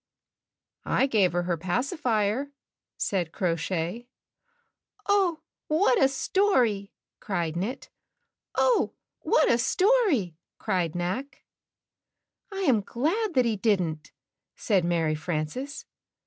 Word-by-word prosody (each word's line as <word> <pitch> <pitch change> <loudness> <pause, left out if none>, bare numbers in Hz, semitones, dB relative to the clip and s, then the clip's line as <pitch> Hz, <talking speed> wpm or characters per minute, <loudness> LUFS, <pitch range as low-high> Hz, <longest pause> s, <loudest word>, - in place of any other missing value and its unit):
"I - - +2
gave 210 -9 +2
her 175 0 0
her 175 -1 -1
pacifier," 240 - -1 0.5
said 180 -5 -1
Crow 180 -5 0
Shay. 175 +7 -3 1.0
"Oh, 385 -5 +2 0.3
what 305 -4 +3
a 270 - +6
story!" 260 - +1 0.3
cried 170 -6 -2
Knit. 205 +10 -4 0.6
"Oh, - - +2 0.2
what - - +3
a 235 - +3
story!" 360 - +2 0.2
cried 175 -3 -1
Knack. 185 +11 -4 1.1
"I 390 0 -4
am 260 - +3
glad 335 - -1
that 255 -1 +4
he 225 -2 +1
didn't," 180 -8 0 0.4
said 195 -5 +1
Mary 165 -2 +1
Frances. 170 - -4
215 Hz, 105 wpm, -27 LUFS, 175-280 Hz, 1.1 s, a